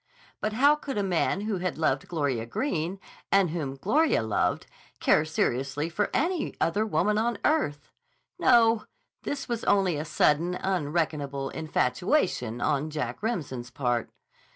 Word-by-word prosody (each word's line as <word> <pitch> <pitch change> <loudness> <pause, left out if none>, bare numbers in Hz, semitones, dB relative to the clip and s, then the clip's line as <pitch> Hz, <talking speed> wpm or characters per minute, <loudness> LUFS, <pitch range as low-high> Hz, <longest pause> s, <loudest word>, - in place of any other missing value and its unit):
But 215 - -2
how 280 +6 +5
could 275 -6 -5
a 205 - +1
man 185 +1 +1
who 210 -1 -2
had 180 0 -2
loved 140 -4 0
Gloria 140 -9 -1
Greene, 180 - -2 0.3
and 195 -4 +4
whom 145 -5 -3
Gloria 245 - +2
loved, 110 - 0 0.3
care 150 - +4
seriously 140 0 -1
for 195 +4 -1
any 335 +2 0
other 205 +6 +1
woman 210 +1 +1
on 230 0 0
earth? 145 - 0 0.5
No; 225 -2 +4 0.4
this 285 - -4
was 235 -2 -3
only 190 -5 +3
a 150 - -2
sudden, 165 +3 +2
unreckonable 150 -6 -1
infatuation 135 - 0
on 150 +1 0
Jack 150 -4 -4
Remsen's 145 - -3
part.... 120 -3 -1
170 Hz, 140 wpm, -27 LUFS, 140-215 Hz, 0.5 s, how